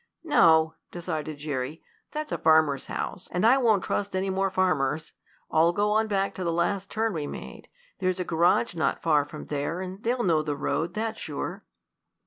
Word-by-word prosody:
"No!" 160 - +5 0.2
decided 155 -3 -4
Jerry. 145 +1 -4 0.3
"That's 305 0 -4
a - - -2
farmer's 155 -4 +3
house, 185 - -4
and 180 +4 +1
I 255 +4 +6
won't 220 -6 +3
trust 200 -1 -2
any 190 +1 0
more 195 +1 +1
farmers. 160 -5 0 0.4
I'll 165 +2 +4
go 205 +2 +1
on 220 +1 +2
back 195 -2 0
to 185 - -5
the 170 - 0
last 185 +3 0
turn 220 0 0
we 150 -3 -3
made. - - -9 0.3
There's 185 -1 0
a - - 0
garage 175 +7 +2
not 165 -2 -1
far 150 -3 +3
from 150 +1 -9
there, 145 +4 -2
and 185 +2 -6
they'll 240 +2 0
know 165 -4 +3
the 150 -2 -3
road, 165 +4 -1
that's 220 +1 -2
sure." - - -5
175 Hz, 185 wpm, -27 LUFS, 155-200 Hz, 0.4 s, I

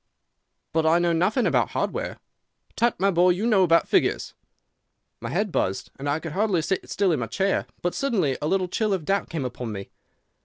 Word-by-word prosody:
"'But 160 0 +2
I 160 +1 +4
know 175 -1 +2
nothing 190 +9 +1
about - - +2
hardware.' - - -2 0.6
"'Tut, 235 0 +1
my 195 +1 +3
boy; 180 0 +4
you 180 +5 +1
know 215 -5 +4
about 170 -2 +4
figures.' - - +1 0.9
"My - - -5
head 200 +3 -1
buzzed, 95 - -1
and 140 +1 -3
I 145 - +1
could 160 -1 -6
hardly 190 -2 +1
sit 190 - -2
still 195 -2 +1
in 155 - +1
my 115 - -3
chair. 190 - 0 0.2
But 175 - 0
suddenly 205 - 0
a 150 - -1
little 190 +1 +1
chill 215 +3 0
of 180 -5 -2
doubt 195 +3 0
came 155 -5 -3
upon 125 -2 -5
me. 100 -2 -7
175 Hz, 200 wpm, -25 LUFS, 155-200 Hz, 0.9 s, I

